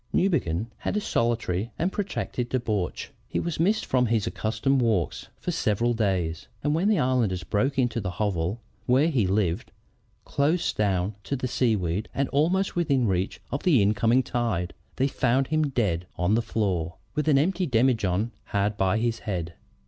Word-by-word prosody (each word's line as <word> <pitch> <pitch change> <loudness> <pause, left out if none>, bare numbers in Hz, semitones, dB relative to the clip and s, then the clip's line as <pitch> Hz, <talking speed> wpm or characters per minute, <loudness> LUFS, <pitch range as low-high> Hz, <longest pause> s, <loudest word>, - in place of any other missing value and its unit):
Newbegin 110 - +1
had - - -2
a - - +3
solitary 115 - 0
and 180 +3 0
protracted 155 - -3
debauch. 110 -7 -2 0.2
He - - -2
was 170 -2 -3
missed 205 +6 +2
from 125 -1 +2
his 115 -2 +1
accustomed 120 +5 0
walks 110 -8 0
for - - -2
several 115 +3 +1
days, 90 - -1 0.2
and 145 +1 +1
when 175 +6 +2
the 215 - +3
islanders 125 - +1
broke 135 +7 0
into 120 -3 +1
the 95 - -3
hovel 95 +1 -1 0.3
where 135 +6 +4
he 120 - +2
lived, 95 0 0 0.5
close 155 +5 +1
down 100 -1 0
to 140 - -1
the 130 -1 -2
seaweed 105 -6 0
and 140 0 +1
almost 175 +7 +1
within 140 -8 +2
reach 95 -2 -1
of 140 - -2
the 160 -9 +4
incoming 110 +5 +3
tide, 110 -9 -1 0.2
they 135 - +2
found 130 0 +1
him 155 -1 +2
dead 95 -9 0
on 90 +3 +1
the 115 - +3
floor, 90 -8 -1 0.2
with 150 +1 -1
an 145 -3 +5
emptied 180 +3 +1
demijohn 115 -4 +2
hard 100 +1 0
by 95 +2 +2
his 115 0 0
head. 90 -4 -3
115 Hz, 170 wpm, -26 LUFS, 100-135 Hz, 0.5 s, an